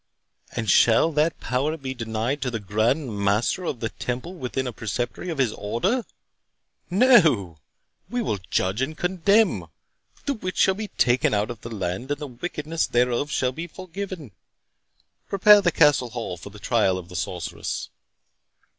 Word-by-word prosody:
And 115 -2 -3
shall 115 - +5
that 155 +2 +1
power 140 +6 -1
be 135 -3 -5
denied 115 +3 -2
to 130 - -1
the 115 -2 -3
Grand 110 +4 0
Master 105 - +1
of 125 - -3
the 115 - -1
Temple 125 +12 -5
within 130 -5 -3
a 125 - -4
preceptory 120 - -4
of 165 - -3
his 125 -5 +1
Order?—No!—we 180 - -1 2.2
will 105 - -1
judge 95 +6 0
and 155 +4 -2
condemn. 195 +5 +2 0.6
The 285 - +1
witch 185 -7 -5
shall 190 - +4
be 210 +2 -5
taken 130 - +2
out 105 +3 0
of 115 -2 -9
the 115 - -7
land, 95 +3 -4
and 145 0 -1
the 150 - -4
wickedness 155 +4 -3
thereof 125 +3 +1
shall 130 -3 0
be 165 +6 -6
forgiven. 185 - -7 1.0
Prepare 205 +1 +7
the 175 -3 +2
Castle 145 -7 +4
hall 115 -6 -4
for 90 - -10
the 105 - -13
trial 105 -4 +1
of 90 -2 -8
the 90 - -11
sorceress." 90 -1 -4
130 Hz, 155 wpm, -24 LUFS, 110-165 Hz, 2.2 s, Prepare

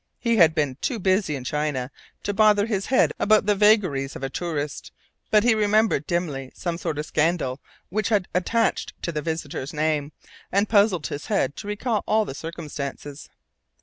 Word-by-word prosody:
He 235 -2 +1
had 165 -4 +6
been 145 -5 0
too 245 - -1
busy 190 -5 +1
in 130 - -6
China 145 -1 -2 0.3
to 205 - -1
bother 210 -1 +4
his 205 -4 -2
head 260 - +3
about 215 0 +4
the 210 - +3
vagaries 195 -10 +3
of - - -8
a 135 - -3
tourist, 150 -5 -4 0.4
but 210 -1 +4
he 240 -1 +5
remembered 215 -6 +2
dimly 150 -7 -2
some 170 -2 -3
sort 160 -4 -3
of 150 - -3
scandal 155 -5 0 0.3
which 215 +5 -1
had 205 -5 +1
attached 225 +6 0
to 170 - -1
the 155 -2 -3
visitor's 160 -2 -4
name, 150 -1 0 0.4
and 200 +2 +2
puzzled 200 -6 +3
his 145 - -5
head 145 -10 0
to - - -7
recall 210 +1 -1
all 215 0 +3
the - - -6
circumstances. 145 -2 -7
170 Hz, 180 wpm, -24 LUFS, 150-210 Hz, 0.4 s, had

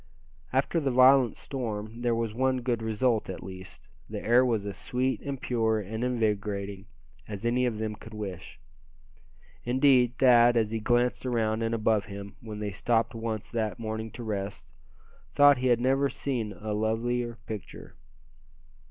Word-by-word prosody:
After 135 +6 +1
the 140 -4 0
violent 130 0 +5
storm 110 -4 -5
there 120 -1 0
was 115 -2 -2
one 130 +1 +1
good 120 -2 -1
result, 110 0 0
at 95 - -6
least; 95 0 -10 0.2
the - - -4
air 120 +3 +4
was 115 -5 0
as 100 -2 -5
sweet 130 +6 -1
and 140 -2 -5
pure 110 -3 +1
and 110 +3 -4
invigorating 105 -4 -2 0.4
as 105 +1 -6
any 125 +2 +2
of 115 -3 -2
them 110 0 -3
could 110 +1 -12
wish. 95 -7 -7 1.0
Indeed, 125 -1 +3
Thad, 120 -2 +6
as 110 -2 +1
he 115 - -1
glanced 120 +2 +1
around 115 -3 0
and 115 0 0
above 110 -2 +1
him, 100 0 -8
when 110 -2 -7
they 105 -1 -3
stopped 115 +4 0
once 115 -2 -4
that 110 -2 -2
morning 110 -1 -4
to 120 - -7
rest, 100 -8 -4 0.7
thought 145 -2 +7
he 130 - +1
had 120 -2 +4
never 135 +3 +2
seen 120 -8 -3
a 105 +3 -5
lovelier 115 +2 -1
picture. 105 -4 -8
115 Hz, 160 wpm, -28 LUFS, 105-125 Hz, 1.0 s, thought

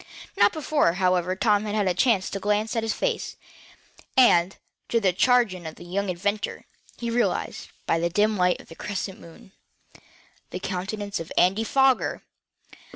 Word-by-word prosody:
Not 200 0 +5
before, 300 - +1
however, 180 -1 +1
Tom 210 +1 +2
had 210 0 -3
had 205 -2 +1
a 180 - +2
chance 195 0 +2
to 195 - -3
glance 210 +2 0
at 230 - +1
his 225 0 -2
face, - - -2 0.8
and, 190 -7 +5 0.3
to 230 - +2
the 190 -4 +2
chagrin 205 -6 +2
of 155 - -8
the - - -12
young 195 +3 -2
inventor, 205 +4 -3 0.3
he 235 -1 -3
recognized, 240 +1 -1 0.2
by 165 - +1
the 170 +1 0
dim 210 +4 +2
light 180 -2 +2
of - - -15
a - - -9
crescent 200 -1 -5
moon, 170 +3 -15 1.0
the - - -5
countenance 200 +2 -4
of 165 - -8
Andy 195 +5 +3
Foger! 265 +2 +2
200 Hz, 165 wpm, -25 LUFS, 180-225 Hz, 1.0 s, Not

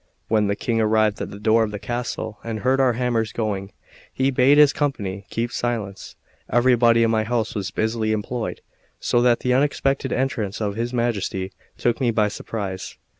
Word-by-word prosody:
When 110 -2 +3
the 100 - 0
King 115 +1 0
arrived 110 -1 +2
at - - -3
the 100 - -9
door 110 +2 +3
of 110 - -1
the 105 - -5
castle, 115 -1 -4
and 110 -2 -4
heard 130 +1 +2
our 130 -2 +4
hammers 115 -2 0
going, 100 -3 -3 0.4
he 135 +1 +1
bade 130 +3 +5
his 150 -1 +7
company 100 -10 -2
keep 120 +1 -2
silence. 110 -6 -3 0.3
Everybody 120 -1 +4
in 115 - +2
my 110 -1 +2
house 115 0 -1
was 100 -3 -3
busily 110 +3 -1
employed, 110 +2 -3 0.4
so 120 - +2
that 120 -1 +3
the 125 - +1
unexpected 135 -1 +1
entrance 120 -6 -1
of 105 -2 -1
his 120 +2 -2
Majesty 105 -6 -1 0.3
took 120 +2 0
me 125 - +3
by 110 -2 +2
surprise. 100 -3 -5
115 Hz, 180 wpm, -23 LUFS, 105-125 Hz, 0.4 s, his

